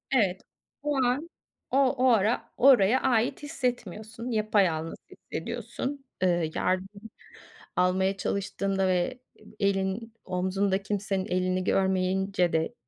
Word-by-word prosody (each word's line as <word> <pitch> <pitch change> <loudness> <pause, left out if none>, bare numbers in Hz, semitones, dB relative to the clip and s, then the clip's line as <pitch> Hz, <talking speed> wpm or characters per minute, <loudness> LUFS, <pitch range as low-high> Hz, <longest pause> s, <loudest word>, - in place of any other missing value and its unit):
Evet, 195 -6 +2 0.4
o 295 -1 0
an 280 +7 0 0.4
o 265 - +2
o 260 -1 +3
ara 225 0 +2
oraya 250 -3 +6
ait 245 +2 +1
hissetmiyorsun, 240 - -4
yapayalnız 195 -7 +1
hissediyorsun. 275 +1 -5 0.2
Eee, 175 -3 +2
yardım 195 +4 -2 0.7
almaya 190 +2 +2
çalıştığında 195 -1 -1
ve 180 -1 +3 0.4
ebi - - -17
elin 200 +3 0
omzunda 190 +2 0
kimsenin 195 -1 -1
elini 185 -1 0
görmeyince 190 -1 +1
de 160 0 0
195 Hz, 105 wpm, -28 LUFS, 185-230 Hz, 0.7 s, oraya